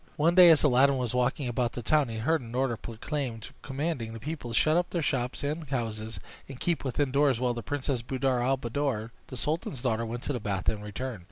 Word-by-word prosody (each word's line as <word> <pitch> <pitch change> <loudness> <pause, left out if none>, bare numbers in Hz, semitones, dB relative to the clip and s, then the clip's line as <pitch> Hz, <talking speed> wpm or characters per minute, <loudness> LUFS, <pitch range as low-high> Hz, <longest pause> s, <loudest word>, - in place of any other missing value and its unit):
One 165 +3 +3
day 180 -1 +9
as 160 -3 +6
Aladdin 135 0 +5
was 125 -3 -2
walking 125 +2 0
about 120 -1 -1
the 120 - -5
town 150 +2 +3
he 115 - -4
heard 155 +8 +1
an 120 0 -8
order 130 -2 +1
proclaimed 115 +1 -5
commanding 135 -5 -3
the 115 - -7
people 145 0 -5
to 115 - -3
shut 155 +5 +4
up 175 0 +1
their 170 -3 -1
shops 130 -2 -1
and 150 +1 -3
houses, 115 -4 -3 0.3
and 135 -2 -8
keep 170 -4 0
within 135 +1 0
doors 140 -3 +3
while 125 -1 +1
the 120 - -5
Princess 140 -1 -2
Buddir 130 0 0
al 135 +2 +2
Buddoor, 120 -3 -2 0.2
the 130 - -7
sultan's 150 -2 -2
daughter, 115 -3 +1
went 120 +1 -5
to 145 - -1
the 125 - -2
bath 100 -4 -3
and 105 -1 -4
returned. 115 +2 -5
130 Hz, 230 wpm, -28 LUFS, 115-145 Hz, 0.3 s, day